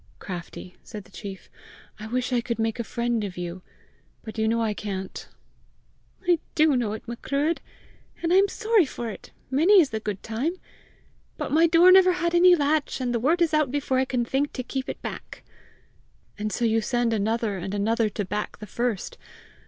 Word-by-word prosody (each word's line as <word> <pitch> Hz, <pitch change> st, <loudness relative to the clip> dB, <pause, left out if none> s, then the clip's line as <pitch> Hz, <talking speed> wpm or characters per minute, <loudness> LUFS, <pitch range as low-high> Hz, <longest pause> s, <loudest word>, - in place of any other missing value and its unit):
"Craftie," 180 Hz, 0 st, -8 dB
said 210 Hz, -3 st, -9 dB
the -, -, -21 dB
chief, 195 Hz, -2 st, -8 dB, 0.5 s
"I 215 Hz, -, -7 dB
wish 250 Hz, +2 st, -1 dB
I 240 Hz, -, +2 dB
could 235 Hz, 0 st, -3 dB
make 225 Hz, +1 st, -1 dB
a -, -, 0 dB
friend 235 Hz, -1 st, -1 dB
of 190 Hz, -3 st, -6 dB
you! 175 Hz, +1 st, -5 dB, 0.6 s
But 220 Hz, 0 st, -7 dB
you 220 Hz, -, +2 dB
know 230 Hz, +1 st, +1 dB
I 220 Hz, -2 st, 0 dB
can't!" 195 Hz, -2 st, -6 dB, 1.0 s
"I 350 Hz, -2 st, +4 dB, 0.2 s
do 310 Hz, -3 st, +4 dB
know 230 Hz, -4 st, 0 dB
it, 220 Hz, -, -8 dB
Macruadh, 280 Hz, +7 st, -1 dB, 0.6 s
and 340 Hz, +1 st, +2 dB
I -, -, +6 dB
am 395 Hz, +1 st, +5 dB
sorry 435 Hz, -6 st, +2 dB
for 240 Hz, -3 st, -5 dB
it, -, -, -11 dB, 0.2 s
many 345 Hz, +9 st, +6 dB
is 305 Hz, -6 st, +3 dB
the 220 Hz, -, -2 dB
good 210 Hz, -3 st, -5 dB
time! 240 Hz, +10 st, -2 dB, 0.8 s
But -, -, -4 dB
my 325 Hz, +3 st, +5 dB
door 345 Hz, +2 st, +7 dB
never 370 Hz, -1 st, +7 dB
had 340 Hz, -1 st, -1 dB
any 355 Hz, +1 st, +7 dB
latch, 295 Hz, -2 st, 0 dB
and 250 Hz, -2 st, -1 dB
the 235 Hz, -, +1 dB
word 325 Hz, +8 st, +3 dB
is 325 Hz, -, 0 dB
out 305 Hz, -3 st, +3 dB
before 265 Hz, -1 st, 0 dB
I 260 Hz, -, +2 dB
can 250 Hz, -2 st, -1 dB
think 275 Hz, +4 st, -1 dB
to 255 Hz, -, -4 dB
keep 265 Hz, +1 st, -4 dB
it -, -, -5 dB
back!" -, -, -7 dB, 0.9 s
"And 215 Hz, 0 st, -3 dB
so 240 Hz, -, -1 dB
you 225 Hz, 0 st, +2 dB
send 240 Hz, 0 st, 0 dB
another 220 Hz, -1 st, 0 dB
and 190 Hz, +3 st, -4 dB
another 220 Hz, +2 st, +1 dB
to 205 Hz, 0 st, -3 dB
back 210 Hz, +3 st, -4 dB
the 210 Hz, -, -8 dB
first! 235 Hz, -1 st, -3 dB
240 Hz, 200 wpm, -25 LUFS, 215-305 Hz, 1.0 s, door